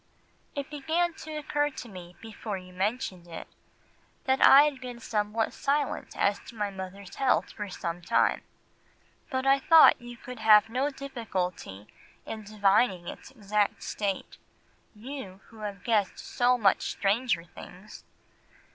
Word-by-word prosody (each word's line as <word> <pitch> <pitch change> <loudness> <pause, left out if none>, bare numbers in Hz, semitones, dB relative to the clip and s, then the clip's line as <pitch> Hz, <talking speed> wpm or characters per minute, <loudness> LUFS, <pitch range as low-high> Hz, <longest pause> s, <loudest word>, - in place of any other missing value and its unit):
"It 280 +1 -5
began 320 +4 0
to 315 -1 -8
occur 295 0 0
to 265 - -9
me 180 -4 -11
before 220 -2 -6
you 185 0 -12
mentioned 190 -2 -2
it, 165 -1 -8 0.8
that 265 0 +2
I 280 +1 +9
had 290 -3 -1
been 245 -2 -7
somewhat 215 0 -1
silent 285 0 -1
as 200 0 +2
to - - -11
my 205 -2 -2
mother's 190 0 -8
health 270 -1 +2
for 210 -2 -6
some 175 -1 -5
time, - - +2 0.9
but 260 -2 -2
I 275 0 +5
thought 320 0 +7
you 240 0 -10
could 250 0 -9
have 220 0 +6
no 260 +5 0
difficulty 190 - -5 0.4
in 220 - -6
divining 200 -3 +2
its - - -8
exact 210 -4 -1
state—you, 210 +2 -7
who 225 - -15
have 205 -3 -6
guessed 215 -4 +1
so 250 +1 +1
much 205 -5 +2
stranger 205 -3 +1
things. 180 +4 -12
220 Hz, 140 wpm, -28 LUFS, 195-265 Hz, 0.9 s, I